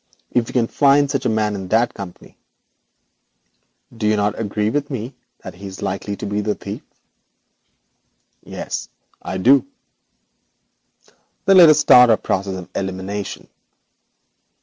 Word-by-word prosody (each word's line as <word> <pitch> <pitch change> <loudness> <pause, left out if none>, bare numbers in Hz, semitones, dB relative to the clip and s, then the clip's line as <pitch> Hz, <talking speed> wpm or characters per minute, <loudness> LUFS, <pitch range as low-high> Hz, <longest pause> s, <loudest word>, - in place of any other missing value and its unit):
If 120 -2 +1
we - - -9
can 120 -3 +2
find 140 +3 +3
such 135 -3 -1
a - - +1
man 110 -1 0
in 95 -2 -6
that 115 +4 +1
company, 95 -3 -10 1.6
do 110 -2 -2
you 105 - +3
not 105 0 -1
agree 105 0 -1
with 145 +1 -2
me 125 -1 -5 0.3
that - - -8
he 100 +2 -10
is 95 0 -9
likely 100 +2 -3
to - - -7
be 105 +1 -2
the 105 0 -1
thief?' - - -7 1.6
'Yes, - - -6 0.3
I - - -5
do.' 130 +9 +5 1.8
'Then 195 0 +5
let 170 -3 +9
us 155 - +5
start 125 -4 +7
our 110 - +5
process 95 0 -2
of 90 - -9
elimination. 95 +1 -5
105 Hz, 145 wpm, -20 LUFS, 100-125 Hz, 1.8 s, let